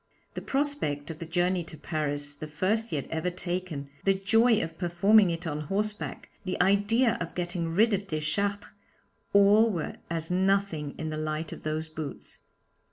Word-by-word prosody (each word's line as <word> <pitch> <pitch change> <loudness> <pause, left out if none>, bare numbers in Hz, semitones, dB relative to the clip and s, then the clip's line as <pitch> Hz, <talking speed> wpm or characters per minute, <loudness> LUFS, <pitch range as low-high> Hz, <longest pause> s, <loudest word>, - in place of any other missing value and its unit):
The - - -5
prospect 270 - -1
of 155 - -9
the 165 - -6
journey 175 +1 +1
to 160 - -9
Paris 145 -2 -2
the 155 +1 -7
first 195 +9 0
he - - -2
had 140 - -3
ever 160 +2 0
taken 175 -5 -4 0.2
the 195 0 +3
joy 225 +4 +4
of 165 0 -7
performing 190 +3 +5
it 165 +1 -3
on 150 -2 -2
horseback, 210 +1 -2
the 185 -2 -3
idea 205 +6 +3
of 170 - -4
getting 175 -1 -2
rid 215 +7 +3
of 200 0 -1
Deschartres, 200 +6 -1 0.6
all 205 +3 +6
were 170 -7 -3
as 165 0 -3
nothing 190 -5 +1
in 160 -1 -3
the 155 - -3
light 155 +1 -3
of - - -8
those 155 +1 -2
boots. 155 -2 -7
175 Hz, 170 wpm, -28 LUFS, 155-200 Hz, 0.6 s, all